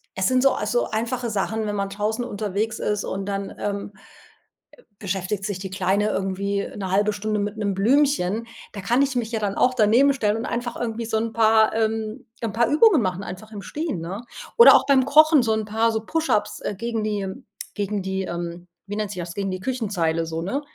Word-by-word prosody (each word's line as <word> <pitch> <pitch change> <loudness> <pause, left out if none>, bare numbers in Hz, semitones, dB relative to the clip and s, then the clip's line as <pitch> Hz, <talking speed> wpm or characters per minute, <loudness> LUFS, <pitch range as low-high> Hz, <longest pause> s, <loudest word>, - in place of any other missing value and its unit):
es 190 0 +1
sind 255 0 +3
so 275 - +6
also, 215 +3 -1
einfache 235 +2 -2
Sachen, 220 +2 -1
wenn 205 -1 -2
man 200 -1 -2
draußen 210 +4 -2
unterwegs 215 -1 -2
ist 210 -1 -1
und 195 0 -4
dann, 200 0 -4
ähm 200 0 -3 1.1
beschäftigt 195 0 -3
sich 200 -3 -3
die 190 0 -5
Kleine 195 +3 +1
irgendwie 200 0 -2
1/2 200 +2 +1
Stunde 210 +1 -2
mit 205 +1 -3
'nem 205 -2 -1
Blümchen, 230 -1 +2 0.3
da 200 - -6
kann 235 +7 +2
ich 275 -2 +1
mich 235 -2 -1
ja 225 - -1
dann 205 -2 -2
auch 255 - +3
daneben 250 +4 +4
stellen 215 -5 0
und 225 - -4
einfach 240 0 -3
irgendwie 230 -1 -3
so 220 0 -1
'n 225 0 -2
paar 220 -1 +4
ähm, 220 0 -2 0.2
'n 225 -3 -2
paar 235 +1 +2
Übungen 315 - +5
machen, 185 -1 -2
einfach 195 +4 -8
im 205 -2 -7
Stehen, 305 - -4
ne? 185 +6 -5 0.4
Oder 470 - +10
auch - - +4
beim 270 -2 +4
Kochen 305 0 +6
so 225 -1 +1
'n 220 0 -1
paar, 225 +2 +1
so 220 -1 -1
push-ups, 320 -8 0
äh, - - -3
gegen 230 +1 -3
die 205 -2 -2 0.5
gegen 205 -1 -2
die, 190 0 -2
ähm 175 0 -5 0.2
wie 205 +1 -5
nennt 210 -2 -2
sich 185 - -6
das 170 0 -6
gegen 195 0 -3
die 185 0 -5
Küchenzeile 190 -10 -1
so 165 0 -4
ne? 225 +12 -2
215 Hz, 210 wpm, -23 LUFS, 195-230 Hz, 1.1 s, Oder